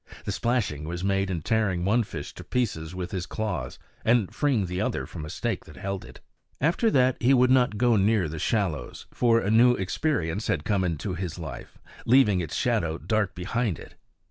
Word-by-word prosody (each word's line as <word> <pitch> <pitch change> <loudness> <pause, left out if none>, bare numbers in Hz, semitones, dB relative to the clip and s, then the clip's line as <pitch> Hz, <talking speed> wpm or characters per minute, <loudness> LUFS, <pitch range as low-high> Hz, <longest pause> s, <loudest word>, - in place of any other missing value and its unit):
The - - -1
splashing 110 - -1
was 85 +2 -4
made 95 0 +1
in 85 -4 -3
tearing 100 -6 +1
one 110 +5 +3
fish 80 -9 -6
to - - -10
pieces 90 -9 -2
with 90 -1 -4
his 90 -2 -3
claws, 90 - -3 0.3
and 115 -4 +2
freeing 135 -9 +1
the 90 +1 -3
other - - -1
from 75 - -7
a - - -7
stake - - -3
that - - -13
held 100 -1 -4
it. - - -13 0.4
After 170 - +2
that 130 - +3
he 130 +3 +5
would 125 0 +4
not 125 -5 +3
go 120 +1 +3
near 100 -2 +3
the 75 +1 -6
shallows; 85 - -2
for 115 -2 +3
a 100 - 0
new 120 +2 +6
experience 100 - -1
had 75 -3 -1
come 100 -3 +1
into 90 +2 -2
his 90 -1 -4
life, 80 -7 -8 0.3
leaving 115 -6 +5
its 80 - -5
shadow 80 -1 0
dark 110 -2 -1
behind 95 +2 -1
it. - - -12
100 Hz, 195 wpm, -26 LUFS, 85-120 Hz, 0.4 s, new